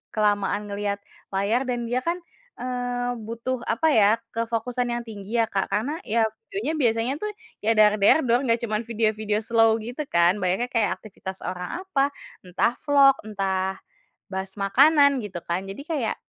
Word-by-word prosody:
kelamaan 205 Hz, -1 st, +1 dB
ngelihat 200 Hz, 0 st, -2 dB, 0.4 s
layar 225 Hz, +7 st, +1 dB
dan 245 Hz, -1 st, -1 dB
dia 250 Hz, -, +2 dB
kan, 335 Hz, +6 st, -1 dB, 0.4 s
eee, 245 Hz, -1 st, -3 dB
butuh 235 Hz, +3 st, -4 dB
apa 320 Hz, -, +1 dB
ya 210 Hz, -6 st, +5 dB, 0.2 s
kefokusan 230 Hz, +2 st, -2 dB
yang 240 Hz, -, -3 dB
tinggi 225 Hz, +1 st, -2 dB
ya, 225 Hz, -, -5 dB
Kak, 195 Hz, -1 st, 0 dB
karena 285 Hz, +10 st, -2 dB
ya 225 Hz, +1 st, +2 dB, 0.2 s
videonya 240 Hz, +11 st, -2 dB
biasanya 230 Hz, 0 st, +1 dB
tuh 425 Hz, -, -3 dB, 0.3 s
ya 225 Hz, +2 st, +1 dB
dar-der-dor 220 Hz, +5 st, +4 dB
nggak 230 Hz, +1 st, +2 dB
cuman 220 Hz, 0 st, -2 dB
video-video 215 Hz, -1 st, 0 dB
slow 225 Hz, 0 st, +4 dB
gitu 245 Hz, +6 st, -5 dB
kan, 170 Hz, +1 st, +3 dB
banyaknya 195 Hz, +7 st, 0 dB
kayak 225 Hz, -3 st, +1 dB
aktivitas 190 Hz, -3 st, -8 dB
orang 180 Hz, -, -4 dB
apa 285 Hz, -7 st, 0 dB, 0.3 s
entah 210 Hz, +7 st, 0 dB
vlog, 275 Hz, -1 st, +6 dB
entah 190 Hz, -2 st, -1 dB, 0.6 s
bahas 190 Hz, 0 st, -4 dB
makanan 280 Hz, +7 st, +5 dB
gitu 185 Hz, -4 st, -6 dB
kan, 180 Hz, +3 st, -3 dB
jadi 195 Hz, +8 st, -7 dB
kayak 295 Hz, -8 st, -2 dB
225 Hz, 155 wpm, -25 LUFS, 200-250 Hz, 0.6 s, vlog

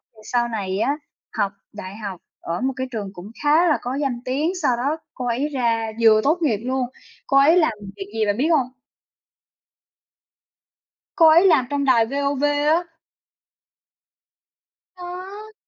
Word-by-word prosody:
thì -, -, -19 dB
sau 240 Hz, +2 st, 0 dB
này 200 Hz, -4 st, -3 dB
á, 275 Hz, +6 st, +1 dB, 0.4 s
học 200 Hz, -, +1 dB, 0.2 s
đại 200 Hz, -2 st, -8 dB
học 200 Hz, -5 st, -7 dB, 0.2 s
ở 170 Hz, +1 st, -4 dB
một 265 Hz, +1 st, 0 dB
cái 260 Hz, 0 st, -3 dB
trường 205 Hz, -5 st, -5 dB
cũng 195 Hz, +3 st, -10 dB
khá 310 Hz, +4 st, +4 dB
là 305 Hz, -, +3 dB
có 250 Hz, +2 st, -3 dB
danh 270 Hz, -4 st, -2 dB
tiếng, 285 Hz, +7 st, 0 dB
sau 255 Hz, -6 st, +2 dB
đó 280 Hz, +6 st, -1 dB, 0.2 s
cô 250 Hz, -, -5 dB
ấy 245 Hz, +5 st, -1 dB
ra 230 Hz, -5 st, 0 dB
vừa 220 Hz, -1 st, +6 dB
tốt 310 Hz, +5 st, +3 dB
nghiệp 260 Hz, -10 st, +2 dB
luôn, 260 Hz, 0 st, -1 dB, 0.4 s
cô 275 Hz, -, +3 dB
ấy 300 Hz, +6 st, +6 dB
làm 315 Hz, -8 st, +3 dB, 0.2 s
việc 195 Hz, -, -6 dB
gì 220 Hz, -1 st, 0 dB
bạn 205 Hz, 0 st, 0 dB
biết 275 Hz, +5 st, +1 dB
hông? 255 Hz, -3 st, -1 dB, 2.5 s
Cô 325 Hz, -2 st, +7 dB
ấy 335 Hz, +4 st, +6 dB
làm 305 Hz, -9 st, +4 dB
trong 285 Hz, -1 st, 0 dB
đài 240 Hz, -4 st, +4 dB
VOV 280 Hz, +2 st, -2 dB
á. 295 Hz, +3 st, +2 dB, 2.1 s
Đó! 375 Hz, +4 st, -9 dB
260 Hz, 160 wpm, -22 LUFS, 225-300 Hz, 2.5 s, Cô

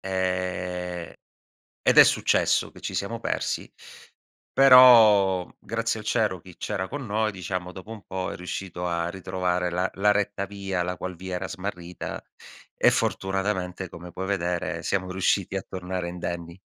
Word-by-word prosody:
Ehm, 90 Hz, -2 st, -3 dB, 0.7 s
ed -, -, +5 dB
è -, -, +12 dB
successo -, -, +2 dB
che -, -, -15 dB
ci -, -, -5 dB
siamo -, -, -2 dB
persi, -, -, -2 dB, 0.8 s
però 110 Hz, -8 st, +7 dB
grazie 115 Hz, 0 st, -2 dB
al 105 Hz, -, -11 dB
cielo 105 Hz, -7 st, +1 dB
chi 90 Hz, -1 st, -15 dB
c'era 95 Hz, -3 st, -3 dB
con 140 Hz, -3 st, -5 dB
noi, 110 Hz, +1 st, 0 dB
diciamo, 90 Hz, -1 st, -4 dB
dopo 95 Hz, +3 st, -11 dB
un 105 Hz, -4 st, -9 dB
po' 95 Hz, -1 st, -3 dB
è -, -, -6 dB
riuscito 90 Hz, 0 st, -5 dB
a 85 Hz, -1 st, -1 dB
ritrovare 90 Hz, -1 st, -1 dB
la 90 Hz, +2 st, -1 dB
la 105 Hz, +1 st, +3 dB
retta 105 Hz, -1 st, -1 dB
via, 95 Hz, -2 st, -3 dB
la 90 Hz, 0 st, -3 dB
qual 90 Hz, +1 st, -6 dB
via 95 Hz, +1 st, -6 dB
era -, -, -4 dB
smarrita 90 Hz, -2 st, -6 dB, 0.5 s
e, -, -, +5 dB
fortunatamente, 95 Hz, -2 st, -1 dB
come 85 Hz, +1 st, -10 dB
puoi 95 Hz, +2 st, -4 dB
vedere, 90 Hz, -3 st, -2 dB
siamo 95 Hz, -1 st, -1 dB
riusciti 95 Hz, +1 st, 0 dB
a 95 Hz, -, -2 dB
tornare 90 Hz, -1 st, -4 dB
indenni. 85 Hz, 0 st, -6 dB
95 Hz, 155 wpm, -26 LUFS, 90-100 Hz, 0.8 s, è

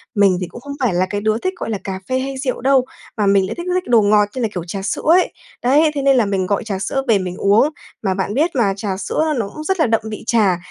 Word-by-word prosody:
Mình 200 Hz, -3 st, +4 dB
thì 180 Hz, -, -2 dB
cũng 240 Hz, -, -11 dB
không 285 Hz, +2 st, -7 dB
phải 250 Hz, -7 st, +1 dB
là 180 Hz, +1 st, +2 dB
cái 205 Hz, 0 st, -2 dB
đứa 215 Hz, +1 st, +1 dB
thích, 370 Hz, +10 st, -2 dB
gọi -, -, -5 dB
là, 215 Hz, -, -1 dB
cà 190 Hz, -1 st, -4 dB
phê 260 Hz, 0 st, +1 dB
hay 270 Hz, 0 st, -4 dB
rượu 260 Hz, -2 st, -3 dB
đâu 265 Hz, 0 st, +3 dB, 0.3 s
mà 210 Hz, -, +1 dB
mình 195 Hz, -1 st, +4 dB
lại -, -, -5 dB
thích 345 Hz, -, -6 dB
thích 365 Hz, -, 0 dB
đồ 235 Hz, -2 st, +5 dB
ngọt 210 Hz, 0 st, +4 dB
như 255 Hz, -, -3 dB
là, 230 Hz, -, +2 dB
kiểu, 175 Hz, -, -4 dB
trà 195 Hz, +3 st, -4 dB
sữa 195 Hz, -, -2 dB
ấy. 350 Hz, +4 st, +4 dB, 0.3 s
Đấy, 295 Hz, +5 st, +4 dB
thế 280 Hz, -, -1 dB
nên 275 Hz, -1 st, +4 dB
là 235 Hz, -, +3 dB
mình 195 Hz, -2 st, -1 dB
gọi 200 Hz, +5 st, -1 dB
trà 200 Hz, -4 st, -4 dB
sữa 270 Hz, +7 st, -2 dB
về 225 Hz, -3 st, +4 dB
mình 180 Hz, -1 st, -4 dB
uống. 210 Hz, +8 st, +4 dB, 0.3 s
Mà 195 Hz, -3 st, 0 dB
bạn 190 Hz, +1 st, -2 dB
biết 310 Hz, +7 st, +1 dB
mà, 215 Hz, -6 st, +2 dB
trà 195 Hz, -2 st, -3 dB
sữa 310 Hz, +10 st, -1 dB
nó 225 Hz, -4 st, -1 dB
cũng 305 Hz, -, -8 dB
rất 380 Hz, +3 st, -1 dB
là 315 Hz, -, +4 dB
đậm 225 Hz, -1 st, +2 dB
vị 215 Hz, -, -7 dB
trà, 205 Hz, -6 st, +3 dB
220 Hz, 295 wpm, -19 LUFS, 195-270 Hz, 0.3 s, đồ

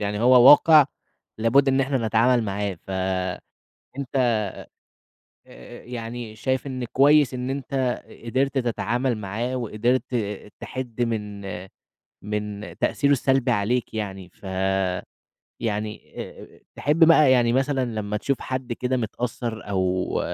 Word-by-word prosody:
يعني 105 Hz, 0 st, -2 dB
هو 125 Hz, +1 st, +7 dB
واقِع 150 Hz, 0 st, +8 dB, 0.5 s
لابُد 135 Hz, +5 st, +3 dB
إن 135 Hz, 0 st, +3 dB
إحنا 130 Hz, -4 st, 0 dB
نتعامل 115 Hz, +2 st, +3 dB
معاه، 100 Hz, -3 st, -3 dB
فأنت 95 Hz, -1 st, -3 dB, 1.9 s
آآ -, -, -13 dB
يعني 115 Hz, -2 st, -7 dB
شايف 130 Hz, +4 st, -2 dB
إن 130 Hz, -2 st, -4 dB
كويس 140 Hz, +2 st, +4 dB
إن 125 Hz, +1 st, -3 dB
أنت 135 Hz, -2 st, -2 dB, 0.2 s
قدِرت 135 Hz, +3 st, 0 dB
تتعامل 120 Hz, 0 st, -1 dB
معاه 110 Hz, +5 st, -3 dB
وقدِرت 120 Hz, +2 st, 0 dB, 0.6 s
تحِد 125 Hz, -3 st, -6 dB
من 105 Hz, -4 st, -2 dB, 0.8 s
من 105 Hz, 0 st, -5 dB
تأثيره 145 Hz, 0 st, +1 dB
السلبي 135 Hz, -1 st, +2 dB
عليك 115 Hz, +3 st, 0 dB
يعني، 95 Hz, -4 st, -5 dB
فيعني 95 Hz, -1 st, -3 dB, 0.9 s
آآ -, -, -10 dB, 0.2 s
تحِب 155 Hz, +4 st, +4 dB
بقى 155 Hz, -4 st, +6 dB
يعني 120 Hz, -2 st, +3 dB
مثلًا 135 Hz, 0 st, +1 dB
لمّا 105 Hz, -3 st, -3 dB
تشوف 140 Hz, +5 st, -1 dB
حد 130 Hz, -2 st, -4 dB
كده 125 Hz, +2 st, -1 dB
متأثّر 115 Hz, -1 st, -4 dB
أو 95 Hz, -1 st, 0 dB
120 Hz, 115 wpm, -24 LUFS, 105-130 Hz, 1.9 s, واقِع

